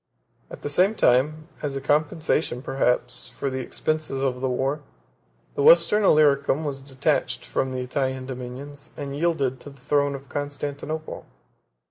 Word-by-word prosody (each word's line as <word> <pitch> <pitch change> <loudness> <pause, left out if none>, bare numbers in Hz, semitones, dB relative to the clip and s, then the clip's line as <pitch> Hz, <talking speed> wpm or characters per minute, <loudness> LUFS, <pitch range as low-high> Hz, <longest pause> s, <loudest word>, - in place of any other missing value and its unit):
At - - -10
the - - -2
same 185 +9 +3
time, 150 - +2
as 140 -2 -3
a - - -1
compensation, 150 -2 0
perhaps, 125 -2 0
for 140 - -2
the 130 - -2
expenses 155 +2 -2
of 130 -2 -1
the 130 - 0
war, 135 +4 -1 0.7
the - - -2
Western 170 +8 +6
Illyricum 150 -3 +4
was 135 -2 -3
detached 135 -1 -1
from 130 - -1
the 130 0 -3
Italian 130 0 -2
dominions, 135 +3 -8
and 140 -1 -5
yielded 140 -5 0
to 145 - -10
the 140 -1 -16
throne 140 +1 +1
of 140 0 -10
Constantinople. 145 +2 -4
140 Hz, 150 wpm, -25 LUFS, 130-150 Hz, 0.7 s, Western